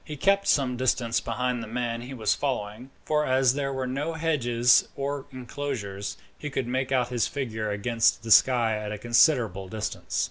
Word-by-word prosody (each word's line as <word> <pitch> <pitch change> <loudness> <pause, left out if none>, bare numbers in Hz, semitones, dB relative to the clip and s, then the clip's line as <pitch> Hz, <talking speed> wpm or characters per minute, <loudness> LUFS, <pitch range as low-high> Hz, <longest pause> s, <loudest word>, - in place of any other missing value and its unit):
He 150 - -8
kept 200 +6 +2
some 130 -4 +2
distance 120 -2 +1
behind 125 -1 -2
the 115 - -7
man 115 0 -3
he 130 +2 -8
was 110 -3 +1
following, 125 -2 -3 0.2
for 150 -1 +1
as 130 -2 +3
there 140 -1 -2
were 130 -1 -3
no 140 +6 -3
hedges 125 -7 +3
or 140 0 -3
inclosures, 125 -6 -5 0.2
he 150 - -5
could 135 -2 -2
make 130 +2 -2
out 125 -2 +1
his 120 -4 0
figure 110 -6 -3
against 115 +2 +1
the 115 - -4
sky 115 -2 +5
at 105 -1 -5
a 105 - -4
considerable 120 - +2
distance. 110 +1 -4
125 Hz, 180 wpm, -26 LUFS, 115-135 Hz, 0.2 s, sky